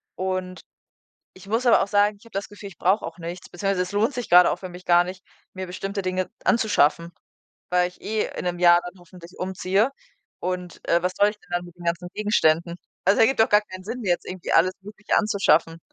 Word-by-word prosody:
Und 185 -1 -3 0.7
ich 185 0 -15
muss 230 +4 0
aber 235 - +6
auch - - -3
sagen, 205 +1 +2
ich - - -20
habe - - -18
das 195 +1 -4
Gefühl, 205 -1 -10
ich - - -18
brauch 195 +4 +2
auch 165 +1 -7
nichts. 175 +2 -7
Beziehungsweise 195 +1 -1
es 185 - -6
lohnt 225 +7 +1
sich 245 -3 -5
gerade 180 0 +7
auch - - -2
für 185 - -7
mich 180 +1 -11
gar 175 0 +5
nicht, 185 +1 -8 0.3
mir 185 0 -5
bestimmte 195 +2 -4
Dinge 185 0 -2
anzuschaffen, 170 -6 +2 0.6
weil 180 0 +2
ich 180 - -22
eh 215 0 -1
in - - -4
'nem 175 0 -2
Jahr 175 0 +6
dann 180 +1 -10
hoffentlich 175 -1 -15
umziehe. 190 +5 0 0.5
Und, 180 -1 -5
äh, 170 0 +3
was 180 - 0
soll 205 +1 +5
ich 210 - -10
denn 180 - -25
dann 175 0 -2
mit 175 - -14
den 175 - -12
ganzen 170 +1 -2
Gegenständen? 170 -5 +1 0.3
Also, 195 +2 +4
ergibt 245 +3 +3
doch 220 - +3
gar 210 0 +5
keinen 185 -3 -11
Sinn 235 +5 -6
jetzt 175 -3 0
irgendwie 185 -1 -6
alles 185 +3 +4
mögliche 210 +1 -3
anzuschaffen. 170 -6 +2
185 Hz, 220 wpm, -24 LUFS, 175-205 Hz, 0.7 s, gerade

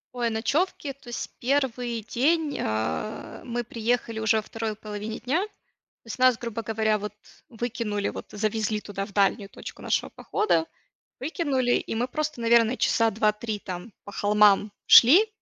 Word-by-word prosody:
Ой, 240 -1 0
ночёвки, 275 +7 -1
то 270 -2 -22
есть 240 - -5
1 245 -3 0
день, 300 +5 +1
а, 110 - -3
мы 240 0 -3
приехали 230 0 -1
уже 220 0 +3
во - - +1
2 225 0 -4
половине 215 +1 -6
дня. 285 +8 0
То 425 - -7 0.6
есть 225 - -6
нас, 255 -2 +5
грубо 230 -1 -5
говоря, 220 0 +1
вот 210 0 -5 0.3
выкинули, 225 -3 -3
вот - - -7
завезли 215 0 -1
туда 195 -1 -5
в 200 - -14
дальнюю 200 +1 +2
точку - - -10
нашего - - 0
похода, 425 -6 0 0.5
выкинули, 270 -4 0
и - - 0
мы 240 +2 0
просто, 300 0 -3
наверно, 230 +1 +4
часа 230 -2 +2
2-3 215 0 0
там 185 +3 -7
по 200 - -10
холмам 210 0 +4 0.2
шли. 330 - +8
230 Hz, 155 wpm, -26 LUFS, 210-250 Hz, 0.6 s, шли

